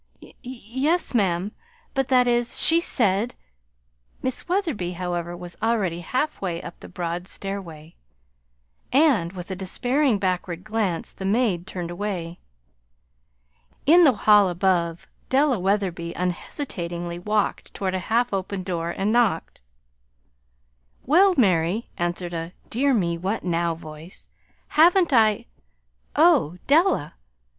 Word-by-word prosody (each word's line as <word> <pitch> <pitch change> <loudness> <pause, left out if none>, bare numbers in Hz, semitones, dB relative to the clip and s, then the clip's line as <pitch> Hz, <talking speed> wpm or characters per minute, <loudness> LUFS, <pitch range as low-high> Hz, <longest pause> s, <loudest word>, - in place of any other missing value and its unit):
"Y - - -15
yes, 260 - -2
ma'am; 195 -3 +1 0.4
but 270 -2 0
that 250 -2 +4
is, 240 0 0
she 330 +1 +5
said 225 - 0 0.4
" - - -41
Miss 260 +6 -3
Wetherby, 320 - -1
however, 175 -1 -4
was 175 -1 -8
already 210 -7 0
halfway 190 - -2
up 170 - -10
the - - -11
broad 175 0 -4
stairway; 170 -6 -6 1.0
and, 250 - +3
with 180 0 -7
a - - -2
despairing 245 +7 0
backward 180 -2 -2
glance, 215 -6 -2
the - - -9
maid 195 -4 +1
turned 175 -2 -5
away. 175 -3 -4 1.5
In 345 +5 +7
the 280 -5 +6
hall 210 -2 +5
above 175 -2 0 0.2
Della 270 -3 +3
Wetherby 180 -3 -1
unhesitatingly 175 - -4
walked 210 +2 -1
toward 190 -2 -2
a 185 - 0
half 240 0 +2
open 190 0 -3
door, 170 -2 -3
and 195 +4 -1
knocked. 220 - +1 1.4
"Well, 365 +7 +5
Mary," 190 -1 +2
answered 175 0 -3
a 165 +1 -5 0.2
"dear 270 +3 +2
me 170 -5 0
what 195 +5 -2
now" 170 -1 0
voice. 155 +2 -11 0.4
"Haven't 340 0 +4
I 220 -3 +4 0.7
Oh, 295 - +4
Della!" 315 - +3
195 Hz, 125 wpm, -24 LUFS, 175-245 Hz, 1.5 s, In